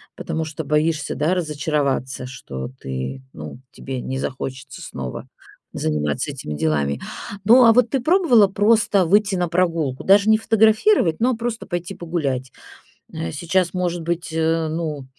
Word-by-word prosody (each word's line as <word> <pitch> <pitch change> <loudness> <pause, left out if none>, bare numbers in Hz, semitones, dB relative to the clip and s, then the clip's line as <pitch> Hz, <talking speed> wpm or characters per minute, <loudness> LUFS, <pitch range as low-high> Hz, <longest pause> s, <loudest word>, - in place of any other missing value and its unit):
потому 160 - -3
что 160 0 -6
боишься, 150 +1 0
да, 160 +5 +1
разочароваться, 145 -5 -1
что 65 - -7
ты, 65 0 -5
ну, 75 +7 -9
тебе 130 -2 -6
не 130 - -4
захочется 130 0 -6
снова 65 -2 -7 0.5
заниматься 75 -2 -1
этими 75 - -6
делами. 75 -2 -1 0.4
Ну, 240 +5 +7
а 225 - +7
вот 240 0 +3
ты 270 - 0
пробовала 260 - +4
просто 205 -1 +3
выйти 200 +3 +3
на 175 -2 -1
прогулку? 165 -6 0
Даже 200 +2 +5
не 220 - +6
фотографировать, 220 - +3
но 245 +3 +3
а - - -1
просто 230 0 -4
пойти 175 +1 -4
погулять? 140 -7 -3 0.6
Э, 85 - -4
сейчас, 175 - 0
может 175 -1 -1
быть, 170 0 -3
э, 160 0 +1
ну, 155 -4 -4
165 Hz, 150 wpm, -21 LUFS, 130-200 Hz, 0.6 s, Ну